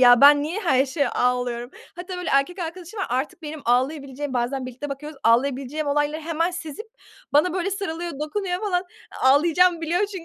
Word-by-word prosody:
ya, 245 0 +8
ben 285 +1 +8
niye 345 +8 -3
her 265 -7 +3
şeye 280 -1 0
ağlıyorum. 245 0 -1 0.3
Hatta, 360 +1 -6
böyle, 360 -1 -3
erkek 275 +7 +2
arkadaşım 350 +4 -6
var, - - -1
artık 305 +7 -2
benim 305 0 -6
ağlayabileceğim, 270 +2 0
bazen 255 +2 -1
birlikte 255 +3 -6
bakıyoruz, 285 +1 -7
ağlayabileceğim 270 +5 +1
olayları 295 +2 0
hemen 330 +2 -1
sezip 345 +4 -7 0.5
bana 310 +4 +4
böyle, 375 +1 -1
sarılıyor, 345 -3 -3
dokunuyor 360 +3 -2
falan, 375 -3 0 0.4
ağlayacağımı 330 +6 +4
biliyor 335 +3 0
çünkü. 380 -5 -8
300 Hz, 170 wpm, -23 LUFS, 270-355 Hz, 0.5 s, ya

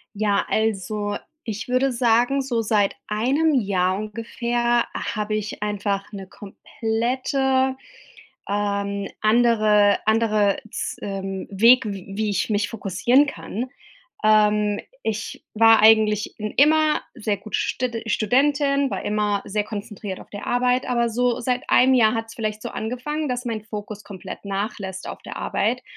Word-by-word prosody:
Ja, 205 -1 +1
also 210 -1 -1 0.3
ich 220 +1 -5
würde 255 +2 +2
sagen, 240 +3 +2
so 240 -4 -1
seit 210 -2 +1
1 265 +9 +1
Jahr 190 -3 0
ungefähr 235 +3 -1
habe 215 -1 -3
ich 210 0 -4
einfach 200 -1 -2
'ne 195 -2 -8
komplette, 260 +6 -1 0.7
ähm, 200 -1 -1
andere 215 -2 +4
andere 215 -2 +3
z - - -4
ähm, 195 -1 -4
Weg, 230 +5 +5
w 200 -3 -5
wie 215 -1 0
ich 195 - -1
mich 205 -1 0
fokussieren 230 +7 +2
kann. 250 -2 -5 0.5
Ähm, 210 -1 +3 0.2
ich 220 0 -4
war 225 0 +6
eigentlich 215 -1 +4
in 215 0 -3
immer 310 +2 +4
sehr 210 -1 -2
gute 210 +2 -4
stede 240 -2 -2
Studentin, 275 +5 +2
war - - -4
immer 210 -1 0
sehr 210 +1 -1
konzentriert 205 -2 -6
auf - - -14
der 205 - -7
Arbeit, 250 +1 +1
aber 235 -1 +1
so 245 +1 0
seit 250 +1 -2
1 260 +1 +5
Jahr 225 -3 +4
hat's 225 0 -4
vielleicht 215 -1 -3
so - - -4
angefangen, 265 +7 -3
dass 250 0 -3
mein 225 -2 -3
Fokus 210 -1 -7
komplett 195 -3 -9
nachlässt 195 -1 -4
auf - - -7
der - - -9
Arbeit. - - -1
215 Hz, 140 wpm, -23 LUFS, 205-245 Hz, 0.7 s, war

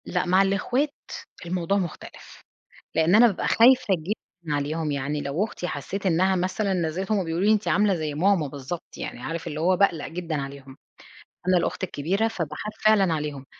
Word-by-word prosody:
لأ، 180 - -1
مع 185 +2 +4
الاخوات 245 +9 0 0.5
الموضوع 180 +2 0
مختلف، 175 -5 -7 0.5
لإن 160 +3 +3
أنا 230 +3 +8
بابقى 205 -6 -1
خايفة 255 +3 +5
جدًا 170 -2 -5
عليهم، 150 +2 -2
يعني 145 +1 -2
لو 145 +7 -1
اختي 180 -4 -5
حسيت 190 +7 -4
إنها 185 +2 +3
مثلًا 190 +3 -1
بالذات 180 +6 -2
هُم 200 -3 +1
بيقولوا 165 +4 -1
لي 215 - +6
أنتِ 215 -1 +1
عاملة 205 -1 +3
زي 155 -3 -3
ماما 180 0 +2
بالضبط، 145 +4 -7
يعني 120 - -6
عارف 165 +5 -4
اللي 150 0 -4
هو 180 +3 +3
باقلق 175 -5 +2
جدًا 165 -2 -4
عليهم، 135 -1 -9 0.7
أنا 185 0 +5
الأخت 175 - -2
الكبيرة 190 +6 0
فباخاف 185 0 -5
فعلًا 200 -5 +5
عليهم، 150 -3 -4
175 Hz, 170 wpm, -25 LUFS, 155-195 Hz, 0.7 s, أنا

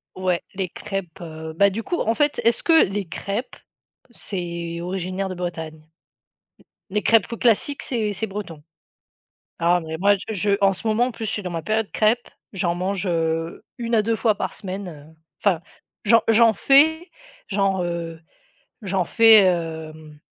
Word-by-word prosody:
Ouais, 185 -2 0
les 190 -2 -3
crêpes, 195 -2 -6
heu 160 -2 -7
bah, 200 +5 +4
du 215 +4 -4
coup, 345 - -2
en 225 - +1
fait, 295 -1 +1
est-ce 230 0 +2
que 325 -1 +6
les 195 +1 -3
crêpes, 200 +8 -5 0.5
c'est 170 -5 -5
originaire 185 +2 -3
de 185 - -6
Bretagne? 160 -3 -5 1.1
Les 210 +2 -1
crêpes, 225 -1 +3
heu, 230 - -4
classiques, 245 +4 +1
c'est 220 -5 -1
c'est 215 +2 -3
breton? 190 -7 -7 1.0
Ah, 175 +1 +3
mais 160 -1 -6
moi, 200 +4 +4
je 220 - -3
je 205 +1 0
en 195 -1 +4
ce 190 - -8
moment, 220 +3 +3
en 255 - -4
plus, 225 - -6
je 215 - -2
suis 205 - -3
dans 180 - -5
ma 165 -1 -3
période 215 +1 0
crêpe. 225 +3 +2 0.3
J'en 175 -3 -1
mange, 185 +2 -2
heu, 165 -1 -1
1 235 -1 -2
à 215 - +4
2 225 +1 0
fois 220 -1 +2
par - - -4
semaine, 195 0 -6
heu, 155 -1 -12 0.3
enfin, 185 -6 +2 0.4
j'en 230 +2 +6
j'en 225 0 +5
fais, 315 - +4 0.4
j'en, 195 -2 0
heu, 170 -1 -4 0.6
j'en 190 -2 0
fais, 225 +1 +7
hem, 160 -3 -3
195 Hz, 175 wpm, -22 LUFS, 170-220 Hz, 1.1 s, fais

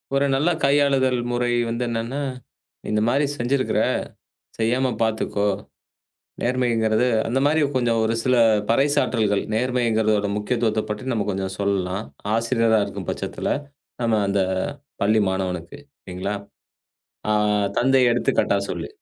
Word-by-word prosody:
ஒரு 140 +1 +3
நல்ல 150 +6 +2
கையாளுதல் 140 -2 +3
முறை 120 0 0 0.2
வந்து 115 +2 -2
என்ன 115 -1 -1
என்றால் 135 +3 -3 0.6
இந்த 105 0 +1
மாதிரி 140 +5 +2
செய்திருக்கிற 130 +2 0 0.8
செய்யாமல் 120 +2 +1
பார்த்துக்கோ. 110 -2 0 0.9
நேர்மை 125 +1 +1
என்கிறது 110 +2 +2 0.2
அந்த 125 +3 0
மாதிரி 155 +2 +3
கொஞ்சம் 120 -3 +2
ஒரு 110 +1 +1
சில 130 -1 +3 0.3
பறைசாற்றல்கள், 115 -5 +2
நேர்மை 125 +2 0
என்கிறதோட 110 -2 +1
முக்கியத்துவத்தைப் 110 0 -1
பற்றி 105 - -5
நம்ம 105 -3 -1
கொஞ்சம் 95 -1 -3
சொல்லலாம், 100 0 -1 0.3
ஆசிரியராக 115 -2 +2
இருக்கும் - - -7
பட்சத்தில் - - -3 0.5
நாம 115 -2 +2
அந்தப் 95 -1 +1 0.5
பள்ளி 110 +1 +3
மாணவனுக்கு. 90 -3 -3 0.2
சரிங்களா? 95 +3 -4 1.0
ஆ, - - +4 0.5
தந்தை 130 +1 +4
எடுத்துக் 120 - 0
காட்டாக - - +1
சொல்லு - - -4
115 Hz, 125 wpm, -23 LUFS, 105-130 Hz, 1.0 s, ஆ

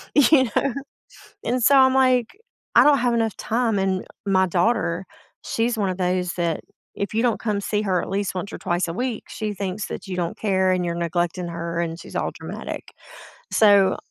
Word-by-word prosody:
you 285 -1 +6
know, 275 -4 +1 0.7
and, 245 +1 0
so, 275 +4 +6
I'm 260 0 +6
like, 255 -3 +3 0.4
"I - - +8
don't 290 -1 +5
have 245 -1 +1
enough 225 -2 0
time." 225 -3 0
and 190 -1 0 0.2
my 190 -1 +3
daughter, 180 -1 0 0.4
she's 230 +1 -1
one 200 -3 0
of 185 - -3
those 180 -1 0
that 170 -2 -1 0.3
if 200 - -3
you 225 - +1
don't 240 -2 +1
come 210 -3 -1
see 210 +1 -1
her 185 -4 +1
at - - -6
least 200 0 -1
once 200 +3 -4
or - - -4
twice 175 +1 -1
a 165 - -4
week, 245 +2 -3
she 215 -1 -4
thinks 195 +1 -4
that - - -7
you 185 - -4
don't 175 -2 -2
care, 190 -3 +1
and 185 -1 +1
you're 170 - -2
neglecting 175 +1 -1
her, 170 0 -4
and 165 0 -3
she's - - -11
all - - -1
dramatic. - - -7 0.6
So, 200 -3 +5
195 Hz, 200 wpm, -23 LUFS, 180-230 Hz, 0.7 s, I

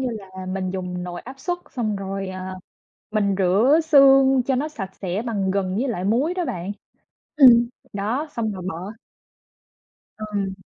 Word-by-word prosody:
như 260 - -1
là, 190 -4 -8
mình 185 0 -2
dùng 180 -1 -4
nồi 175 -1 -6
áp 265 +2 -11
suất 350 +4 -2
xong 215 -5 -2
rồi, 195 0 -4
à, 185 0 -6 0.6
mình 200 -2 +1
rửa 205 - +4
xương 270 -3 +6
cho 265 +1 0
nó 285 +4 -1
sạch 195 -11 -6
sẽ 190 +1 -3
bằng 200 -5 -1
gừng 190 -1 -1
với 250 +7 0
lại 200 -7 -3
muối 250 - +1
đó 365 -1 -2
bạn 180 - -4 0.6
ừm, 240 -5 +7 0.2
đó, 220 +10 -2
xong 220 -2 -2
rồi 185 -3 -7
bỏ 180 +4 -6 1.3
Ừm. 205 -3 -3
205 Hz, 170 wpm, -23 LUFS, 190-260 Hz, 1.3 s, ừm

